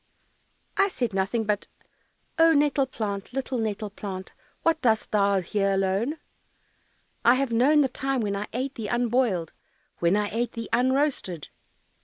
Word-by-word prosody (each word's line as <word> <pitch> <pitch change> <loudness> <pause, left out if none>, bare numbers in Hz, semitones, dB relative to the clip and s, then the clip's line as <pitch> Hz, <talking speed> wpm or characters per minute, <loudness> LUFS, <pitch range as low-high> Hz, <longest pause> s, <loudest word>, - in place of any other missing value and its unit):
"I 395 - +5
said 245 - -2
nothing 195 +4 0
but, 210 -1 -1 0.7
"Oh, 325 0 +7
nettle 285 -2 +3
plant, 205 -3 -4
Little 260 -1 -2
nettle 215 -1 -2
plant, 190 -2 -6 0.3
What 325 -1 +2
dost 220 -3 +1
thou 200 -2 +3
here 195 +2 0
alone? 195 +9 0 1.1
I 240 - +6
have 270 -1 0
known 275 +6 +4
the 275 - +3
time 265 0 -2
When 200 -2 -1
I 205 +1 -3
ate 260 +3 -3
thee 225 -5 -5
unboiled, 240 -8 +1 0.5
When 170 +3 +3
I 210 0 0
ate 235 +2 -1
thee 230 -1 -6
unroasted." 255 - +1
230 Hz, 150 wpm, -26 LUFS, 200-265 Hz, 1.1 s, Oh